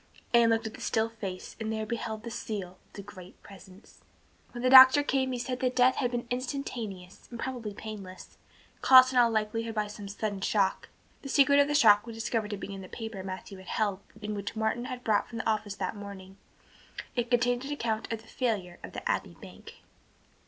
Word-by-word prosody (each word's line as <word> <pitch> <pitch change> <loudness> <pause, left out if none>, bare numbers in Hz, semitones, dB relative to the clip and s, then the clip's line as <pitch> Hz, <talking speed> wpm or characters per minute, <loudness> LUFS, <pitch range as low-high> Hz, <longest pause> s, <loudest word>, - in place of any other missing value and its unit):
Anne 235 -1 +6
looked 225 0 +1
at 220 - -5
the - - -11
still 220 0 0
face 195 -5 -7
and 220 -1 -3
there 220 0 -2
beheld 220 -1 -4
the 235 - -6
seal 210 -5 -4 0.2
of - - -34
the 200 - -8
Great 185 -2 -13
Presence. 195 +1 -15 0.5
When 240 0 -7
the 255 - +3
doctor 265 +2 +10
came 265 -2 0
he 250 - -2
said 250 +1 -4
that 255 0 0
death 255 +1 +4
had 250 - +1
been 240 0 -3
instantaneous 240 -8 -5
and 235 - -8
probably 235 -6 -5
painless, 200 -4 -9 0.4
caused 255 0 +8
in 250 - +4
all 235 -1 +5
likelihood 225 +1 -2
by 210 -1 0
some 205 -1 -9
sudden 200 0 -4
shock. 195 -1 0 0.3
The 275 - -8
secret 280 +1 +5
of 285 - +5
the 295 - -1
shock 210 -4 +6
was 230 -1 -8
discovered 225 -1 -2
to 205 - -4
be 200 - -7
in 195 - -7
the 185 - -11
paper 220 -4 -6
Matthew 190 0 -7
had 190 - -14
held 205 -3 -1 0.2
and 210 0 -3
which 200 +2 -5
Martin 220 +2 -1
had 250 -1 -6
brought 215 -3 +1
from 230 - -7
the 225 - -3
office 215 -2 -1
that 185 +2 -3
morning. 195 -2 -10 0.8
It 240 -1 -1
contained 245 0 +2
an 285 - -5
account 230 -6 -2
of 225 -1 -4
the - - -20
failure 210 -9 -2
of - - -9
the - - -5
Abbey - - -2
Bank. - - -13
220 Hz, 215 wpm, -29 LUFS, 205-245 Hz, 0.8 s, doctor